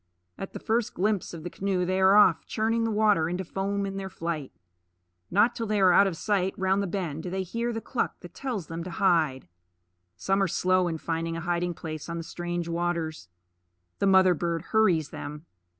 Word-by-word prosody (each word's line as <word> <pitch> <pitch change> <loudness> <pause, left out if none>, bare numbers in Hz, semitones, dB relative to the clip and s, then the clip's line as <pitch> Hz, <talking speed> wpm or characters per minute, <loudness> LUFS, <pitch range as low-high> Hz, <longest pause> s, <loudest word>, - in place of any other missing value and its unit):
At 195 - -7
the - - -6
first 225 0 -1
glimpse 205 0 0
of 165 -2 -8
the 175 - -5
canoe 190 -2 -1
they 185 +1 0
are 190 +1 +6
off, 190 -5 +6
churning 225 +1 0
the - - 0
water 210 -7 +3
into 180 +2 -3
foam 200 +3 -2
in 195 0 -4
their 195 -1 -4
flight. 165 -5 -4 0.8
Not 215 +6 +4
till 230 -1 -4
they 210 0 +1
are 185 -2 +6
out 200 - +6
of 175 -4 -3
sight 195 -2 0
round 190 +1 +1
the 200 - -1
bend 170 -5 -3
do 180 - -5
they 190 +1 -2
hear 230 +6 -2
the 225 -1 -4
cluck 245 - -2
that 175 -1 -11
tells 245 -10 -4
them 165 +2 -5
to 185 - -6
hide. 165 - +1 0.7
Some 195 - +1
are 195 - +3
slow 185 +1 +2
in 165 -2 -2
finding 165 +1 -3
a - - -4
hiding 175 0 -1
place 155 -1 -6
on 170 - -3
the 165 - -4
strange 175 +1 -4
waters. 170 - -2 0.7
The 200 - +2
mother 190 -1 +6
bird 170 -1 -2
hurries 180 -9 +3
them. 150 +2 -7
180 Hz, 210 wpm, -27 LUFS, 165-200 Hz, 0.8 s, are